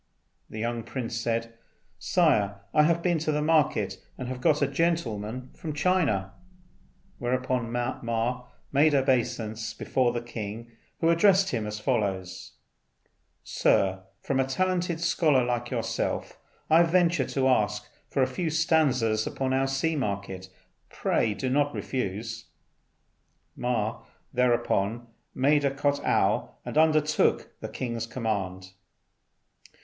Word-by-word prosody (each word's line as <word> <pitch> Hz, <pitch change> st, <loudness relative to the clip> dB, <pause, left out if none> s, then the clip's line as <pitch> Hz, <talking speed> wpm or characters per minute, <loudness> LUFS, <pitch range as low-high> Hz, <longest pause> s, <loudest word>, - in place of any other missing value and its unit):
The -, -, -8 dB
young 115 Hz, +1 st, -2 dB
prince 115 Hz, -1 st, -5 dB
said, 115 Hz, 0 st, -2 dB, 0.5 s
"Sire, 100 Hz, -1 st, +2 dB
I 150 Hz, -, +6 dB
have 170 Hz, +2 st, +2 dB
been 175 Hz, -3 st, +2 dB
to 155 Hz, 0 st, -1 dB
the 150 Hz, -, 0 dB
market, 155 Hz, -1 st, +1 dB
and 130 Hz, -, -5 dB
have 130 Hz, -1 st, -5 dB
got 150 Hz, +3 st, +3 dB
a -, -, +3 dB
gentleman 130 Hz, -7 st, -1 dB
from 155 Hz, -2 st, -6 dB
China." 150 Hz, -, +1 dB, 0.9 s
Whereupon 125 Hz, -1 st, -1 dB
Ma 120 Hz, 0 st, -2 dB, 0.2 s
made 145 Hz, +2 st, +4 dB
obeisance 115 Hz, -4 st, 0 dB
before 125 Hz, +2 st, +1 dB
the 120 Hz, 0 st, -4 dB
king, 115 Hz, 0 st, -6 dB, 0.3 s
who 165 Hz, -, +3 dB
addressed 190 Hz, +2 st, +4 dB
him 110 Hz, -5 st, -2 dB
as 105 Hz, 0 st, -5 dB
follows: 95 Hz, -3 st, -2 dB, 0.9 s
"Sir, 95 Hz, -1 st, +2 dB, 0.2 s
from 135 Hz, -1 st, -1 dB
a -, -, +4 dB
talented 175 Hz, +4 st, -1 dB
scholar 160 Hz, -6 st, +3 dB
like 120 Hz, 0 st, -2 dB
yourself 120 Hz, -3 st, -2 dB, 0.3 s
I 160 Hz, +2 st, +6 dB
venture 170 Hz, -4 st, +3 dB
to 130 Hz, +1 st, 0 dB
ask 105 Hz, -5 st, +1 dB, 0.2 s
for 135 Hz, -, +2 dB
a -, -, +4 dB
few 170 Hz, +4 st, -2 dB
stanzas 140 Hz, -9 st, +2 dB
upon 130 Hz, -1 st, -2 dB
our 135 Hz, 0 st, +2 dB
sea 145 Hz, +5 st, 0 dB
market. 100 Hz, -7 st, -3 dB, 0.4 s
Pray 110 Hz, -2 st, 0 dB
do 130 Hz, -, -3 dB
not 145 Hz, +2 st, +1 dB
refuse." 115 Hz, -1 st, -4 dB, 1.1 s
Ma 115 Hz, -3 st, -2 dB, 0.3 s
thereupon 120 Hz, -3 st, +1 dB, 0.3 s
made 145 Hz, +2 st, +3 dB
a 140 Hz, -, +3 dB
kot'ow 140 Hz, +1 st, +1 dB
and -, -, -5 dB
undertook 155 Hz, -1 st, +3 dB
the -, -, -6 dB
king's 115 Hz, -3 st, -4 dB
command. 95 Hz, -6 st, -3 dB
125 Hz, 125 wpm, -27 LUFS, 115-150 Hz, 1.1 s, I